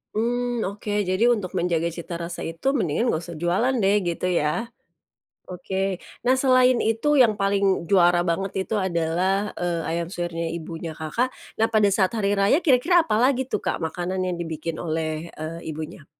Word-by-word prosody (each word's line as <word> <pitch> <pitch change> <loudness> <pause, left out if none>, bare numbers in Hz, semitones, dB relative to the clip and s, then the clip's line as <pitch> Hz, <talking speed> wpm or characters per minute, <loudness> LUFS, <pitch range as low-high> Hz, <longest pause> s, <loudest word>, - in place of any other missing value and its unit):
Mmm, 240 +1 0
oke. 205 +2 -6 0.2
Jadi 185 +5 +1
untuk 205 -6 -2
menjaga 170 -2 +1
cita 170 0 -6
rasa 170 0 -5
itu 165 +9 -5
mendingan 225 - 0
nggak 165 -5 0
usah 165 - -8
jualan 195 +10 +2
deh, 200 +2 +4
gitu 170 +1 -1
ya. 175 +5 0 0.8
Oke, 190 +1 -3 0.2
nah 255 +1 +3
selain 255 -2 +4
itu 250 +6 +2
yang 220 -4 +5
paling 195 -2 +2
juara 175 -1 +4
banget 190 +2 -1
itu 220 - -4
adalah, 185 +4 0
eee, 175 -1 -1
ayam 170 0 -2
suwirnya 170 -2 -3
ibunya 165 -1 -7
Kakak, 160 +12 -1 0.3
nah 225 - +4
pada 215 -2 +3
saat 190 -1 +3
hari 200 -2 +1
raya. 205 - +3
Kira-kira 320 +5 +4
apa 325 - -1
lagi 260 0 +3
tuh 255 - -3
Kak - - -1
makanan 180 +3 -3
yang 180 -1 -2
dibikin 165 0 -4
oleh, 160 0 -3
eee, 160 +2 -5
ibunya? 155 0 -7
185 Hz, 170 wpm, -24 LUFS, 170-225 Hz, 0.8 s, yang